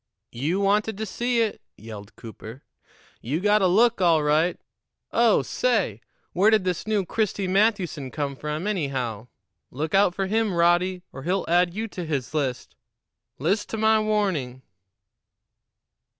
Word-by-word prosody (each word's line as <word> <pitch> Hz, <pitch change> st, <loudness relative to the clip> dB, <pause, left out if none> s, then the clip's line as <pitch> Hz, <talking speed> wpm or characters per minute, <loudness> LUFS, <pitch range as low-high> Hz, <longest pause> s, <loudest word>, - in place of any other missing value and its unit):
"You 150 Hz, +11 st, -1 dB
wanted 205 Hz, +1 st, +1 dB
to 220 Hz, -, -3 dB
see 240 Hz, +4 st, 0 dB
it," 220 Hz, -, -4 dB, 0.2 s
yelled 105 Hz, -2 st, -10 dB
Cooper. 115 Hz, +3 st, -11 dB, 0.6 s
"You 140 Hz, +8 st, -2 dB
got 210 Hz, +2 st, +3 dB
a 190 Hz, -, +4 dB
look, 220 Hz, +3 st, +3 dB
all 165 Hz, -4 st, +4 dB
right. 155 Hz, +4 st, +2 dB, 0.5 s
Oh, -, -, +3 dB
say! -, -, 0 dB, 0.3 s
Where 195 Hz, +5 st, +4 dB
did 220 Hz, -3 st, +3 dB
this 180 Hz, +1 st, -2 dB
new 210 Hz, -3 st, +1 dB
Christy 205 Hz, -1 st, -1 dB
Mathewson 185 Hz, -, +1 dB
come 140 Hz, 0 st, -3 dB
from, 150 Hz, +5 st, -4 dB
anyhow? 135 Hz, -, -2 dB, 0.4 s
Look 150 Hz, +4 st, -4 dB
out 195 Hz, -2 st, +4 dB
for 195 Hz, -, -1 dB
him, 215 Hz, -1 st, 0 dB
Roddy, 175 Hz, +2 st, +2 dB
or 135 Hz, -, -8 dB
he'll 180 Hz, +6 st, -1 dB
add 175 Hz, +1 st, +2 dB
you 220 Hz, +2 st, -3 dB
to 180 Hz, -, -6 dB
his 145 Hz, -5 st, -3 dB
list. 135 Hz, -5 st, -3 dB, 0.6 s
List' 185 Hz, +10 st, -1 dB
to 225 Hz, -, -4 dB
my 220 Hz, 0 st, +4 dB
warning." 190 Hz, -13 st, -1 dB
180 Hz, 150 wpm, -24 LUFS, 150-210 Hz, 0.6 s, a